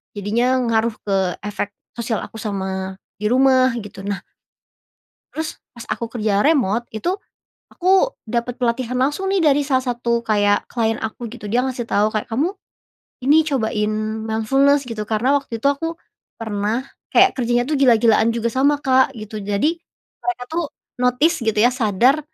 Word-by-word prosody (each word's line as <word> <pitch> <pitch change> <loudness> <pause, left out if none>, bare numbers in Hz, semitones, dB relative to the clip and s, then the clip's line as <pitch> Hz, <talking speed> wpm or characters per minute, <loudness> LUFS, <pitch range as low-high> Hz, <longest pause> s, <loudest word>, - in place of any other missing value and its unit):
jadinya 235 +6 +1
ngaruh 230 0 +2 0.2
ke 200 - +2 0.3
efek 205 0 -3 0.2
sosial 230 -1 -2
aku - - -16
sama 190 -2 -4 0.2
di 210 - -4
rumah 260 0 +4
gitu, 205 -2 -9
nah 200 0 -2 1.1
terus 320 +1 -4 0.2
pas 235 - -9
aku 235 - -4
kerja 210 -2 +1
remote 240 -7 +2
itu, 220 +11 -2 0.6
aku 380 +7 +3
dapat 235 +2 -2
pelatihan 245 0 -1
langsung 295 +9 0
nih 390 -1 +2
dari 290 -1 +4
salah 260 -2 +1
satu 235 -1 -1
kayak 205 -2 +2
klien 225 -2 +1
aku 220 +2 -5
gitu 235 0 -11
dia 245 - +4
ngasih 255 -2 -3
tahu 210 +1 +3
kayak 215 - -2
kamu, 280 +9 +2 0.8
ini 285 +4 +5
cobain 220 -6 0 0.4
mindfulness 270 +6 +3
gitu 230 -3 -4
karena 225 +5 +1
waktu 260 -4 -7
itu 275 - +1
aku, 325 +4 -4 0.4
pernah 220 +2 -2 0.3
kayak 385 +1 +7
kerjanya 240 -1 0
tuh 285 +2 -1
gila-gilaan 230 -4 +5
juga 235 0 -1
sama 275 +4 +3
Kak 260 0 +3
gitu 215 -1 -7
jadi, 205 +12 0 0.4
mereka 360 -9 -3
tuh 340 +1 0 0.4
notice 250 +7 +3
gitu 225 -3 0
ya 230 +4 +4
sadar, 245 +4 +3
235 Hz, 155 wpm, -20 LUFS, 215-270 Hz, 1.1 s, kayak